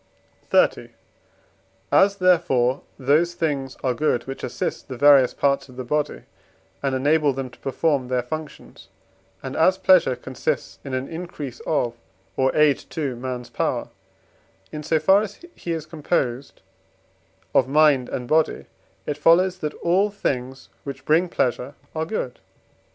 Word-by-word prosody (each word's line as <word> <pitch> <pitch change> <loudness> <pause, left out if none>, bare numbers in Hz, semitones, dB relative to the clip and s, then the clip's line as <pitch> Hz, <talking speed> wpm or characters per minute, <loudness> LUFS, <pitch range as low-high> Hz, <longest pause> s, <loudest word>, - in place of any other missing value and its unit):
XXX. - - +3 1.0
As, 200 +1 +5
therefore, 160 -9 +2 0.2
those 155 +6 +2
things 145 -6 -2
are 130 - +1
good 120 -2 0
which 135 0 -7
assist - - -4
the 130 - -7
various 140 -2 +6
parts 140 -1 +1
of 125 - -14
the 130 - -5
body, 150 +4 -2 0.6
and 135 -1 0
enable 145 +2 +2
them 130 -1 -5
to - - -18
perform 135 -1 0
their 125 -1 0
functions; 155 -2 -8 0.6
and 130 0 -5
as 185 +4 +4
pleasure 185 -10 +4
consists 130 +1 -4
in 135 -2 -4
an 130 +1 -3
increase 160 -6 -7
of, 120 -6 0 0.4
or 130 0 +2
aid 150 -3 +4
to, 140 -6 -3
man's 125 0 -6
power, - - -2 0.8
in 150 - -5
so 160 +1 +1
far 190 +6 +4
as 205 -1 -6
he 170 - -6
is 160 -2 -3
composed 145 -5 -2 0.9
of 130 - +4
mind 145 -3 +4
and 125 -1 -4
body; 155 +3 +1 0.4
it 145 - -3
follows 180 +4 +4
that 150 -3 -4
all 185 +5 +3
those 205 - -19
things 130 -3 -3
which 135 -1 -7
bring 165 +4 +3
pleasure 130 -1 -1 0.2
are 160 0 -2
good. 130 - -4
145 Hz, 150 wpm, -23 LUFS, 130-160 Hz, 1.0 s, various